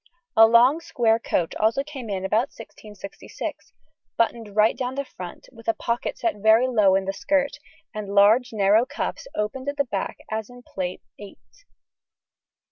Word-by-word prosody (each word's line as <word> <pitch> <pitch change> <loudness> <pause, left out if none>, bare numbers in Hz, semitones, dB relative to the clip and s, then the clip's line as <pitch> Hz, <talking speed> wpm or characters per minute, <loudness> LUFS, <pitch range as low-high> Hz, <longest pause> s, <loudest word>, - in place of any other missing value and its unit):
A 225 0 +8
long 245 +7 +5
square 230 -8 +1
coat 170 -6 -1
also 220 +5 +2
came 275 -6 -8
in 190 -1 -3
about 220 +7 +1
1666, 210 -3 -9 0.5
buttoned 230 -3 -1
right 215 +1 +4
down 255 0 -3
the 280 0 -3
front, 180 -7 -10
with 230 -2 -7
pockets 235 0 -3
set 340 -8 0
very 220 +4 +4
low 210 -6 +4
in 195 0 0
the 195 - -2
skirt, 285 +6 0 0.3
and 210 -2 -6
large 220 +5 +5
narrow 210 +1 +3
cuffs 285 - -5
opened 260 +6 -3
at 285 - -5
the 280 - +1
back 200 -6 -4
as 220 0 -3
in 245 0 -14
Plate 185 -4 -5 0.2
VIII 205 -1 -11
(see - - -26
p. - - -58
225 Hz, 170 wpm, -24 LUFS, 205-255 Hz, 0.5 s, A